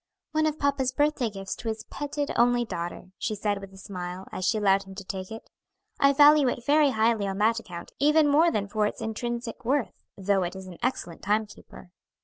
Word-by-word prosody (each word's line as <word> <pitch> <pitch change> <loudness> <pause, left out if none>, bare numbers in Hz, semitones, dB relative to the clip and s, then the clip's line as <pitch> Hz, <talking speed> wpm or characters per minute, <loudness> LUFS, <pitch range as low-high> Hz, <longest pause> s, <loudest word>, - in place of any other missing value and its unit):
"One 310 0 +2
of 310 0 -2
papa's 280 -3 +1
birthday 290 -5 +1
gifts 195 -2 -6
to 235 - -7
his 220 0 -3
petted 290 0 -3
only 240 0 +3
daughter," 175 -1 -6
she 215 - -2
said, 205 -1 -1
with 195 -1 -10
a 190 - -15
smile, 185 -1 -6
as 185 - -3
she 220 - +2
allowed 195 -2 +3
him 195 -1 -11
to 200 - -7
take 190 -1 -6
it. 225 0 -9 0.5
"I 275 0 +6
value 290 0 +6
it 240 -1 -2
very 295 0 +5
highly 220 -3 +1
on 195 0 -3
that 225 +3 +2
account 175 -6 -9
even 300 +2 +4
more 310 +4 +5
than 205 -8 -1
for 210 0 +1
its - - -6
intrinsic 235 +1 -4
worth; 265 +1 0 0.2
though 195 0 +1
it 175 +1 -3
is 190 0 -8
an 180 -2 -11
excellent 235 -9 -3
time 210 +2 +1
keeper." 205 -3 -15
220 Hz, 215 wpm, -27 LUFS, 195-275 Hz, 0.5 s, I